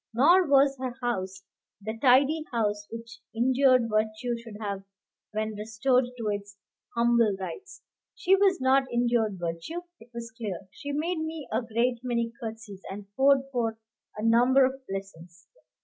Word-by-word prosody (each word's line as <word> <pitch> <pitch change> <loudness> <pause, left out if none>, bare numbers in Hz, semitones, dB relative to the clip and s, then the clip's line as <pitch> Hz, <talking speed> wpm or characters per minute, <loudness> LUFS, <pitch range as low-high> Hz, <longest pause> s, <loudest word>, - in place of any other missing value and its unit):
Nor 340 +8 +5
was 275 0 +5
her 255 -2 -4
house 190 -6 -3 0.4
the 220 +2 -5
tidy 275 +6 +4
house 210 -3 -1
which 230 0 -9 0.2
injured 255 0 +4
virtue 215 +2 -1
should 230 -3 -10
have 200 -3 -4 0.5
when 215 0 -2
restored 220 +5 +1
to 230 -2 -3
its 205 -1 -5 0.4
humble 235 -3 +3
rights. 385 - -8 0.3
She 380 +2 +4
was 390 -2 +3
not 265 +1 +3
injured 235 -4 +1
virtue, 170 - -4 0.2
it 230 - -16
was 235 -1 -7
clear. 205 -7 -4
She 285 - -7
made 320 +4 -1
me 315 -2 -5
a - - +1
great 235 +1 0
many 235 -2 -1
curtseys, 220 -4 -7
and 200 +1 -9
poured 275 0 +5
forth 230 -3 -1 0.4
a 210 - -4
number 245 +4 +5
of 265 +1 -3
blessings. 180 -3 -8
235 Hz, 150 wpm, -27 LUFS, 210-265 Hz, 0.5 s, Nor